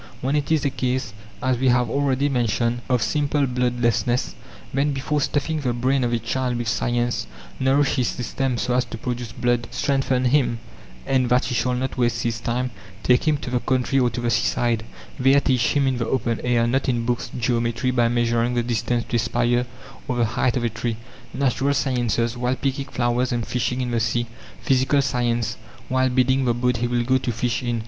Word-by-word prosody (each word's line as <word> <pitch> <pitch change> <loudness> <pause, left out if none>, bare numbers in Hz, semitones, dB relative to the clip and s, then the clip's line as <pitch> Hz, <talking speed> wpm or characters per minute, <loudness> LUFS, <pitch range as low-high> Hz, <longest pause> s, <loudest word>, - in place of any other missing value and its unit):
When 135 +3 -1
it 145 0 -1
is 155 -3 +2
a 140 - +1
case, 130 -3 -2 0.3
as 130 -2 +1
we 130 - +2
have 125 -1 +3
already 140 +2 +1
mentioned, 120 -2 0
of 125 -2 +2
simple 145 -1 +1
bloodlessness, 120 -1 0 0.4
then 140 +2 +1
before 145 +2 -1
stuffing 150 +3 0
the 125 -3 0
brain 130 +2 +1
of 120 - 0
a 120 - +2
child 125 +1 -2
with 120 -1 -2
science, 120 - 0 0.3
nourish 135 +2 +2
his 125 - +2
system 125 +1 -2
so 125 - -1
as 125 0 +3
to 115 - -7
produce 120 0 -4
blood, 120 0 0
strengthen 130 0 0
him, 125 -2 +2 0.5
and, 130 -2 +1
that 125 0 +3
he 125 - -2
shall 125 +1 +1
not 130 +1 -3
waste 120 0 +1
his 115 -1 -1
time, 125 +2 -2 0.3
take 125 +5 +3
him 150 -1 +3
to 125 - -6
the 125 - +1
country 130 +1 +1
or 125 -2 +3
to 120 - -5
the 120 0 0
seaside; 115 -2 +1 0.4
there, 135 +2 +5
teach 130 -3 +1
him 140 -1 +3
in 130 -2 +1
the 115 - -1
open 120 -3 -1
air, 120 -1 +2
not 130 +3 0
in 120 -2 0
books 120 0 -1
geometry, 120 +1 0
by 120 -2 +3
measuring 120 0 +1
the 120 - +1
distance 120 0 -1
to 120 - 0
a - - +1
spire, 120 +1 +1 0.4
or 125 - -1
the 120 -1 +2
height 120 +2 0
of 120 - -2
a 120 - +1
tree; 115 0 -3 0.3
natural 140 +1 +1
sciences, 120 -3 0
while 125 +1 0
picking 135 +1 -2
flowers 125 -1 0
and 120 -2 -1
fishing 125 +1 -1
in 125 -1 -2
the 120 - +1
sea; 120 +1 0 0.4
physical 135 +2 +3
science, 120 -4 0 0.3
while 130 0 +2
building 130 +1 +2
the 120 -1 +2
boat 125 0 +1
he 120 +1 0
will 120 0 0
go 130 +2 +2
to 125 - -2
fish 115 +1 -1
in. 120 -2 -1
125 Hz, 205 wpm, -23 LUFS, 120-130 Hz, 0.5 s, there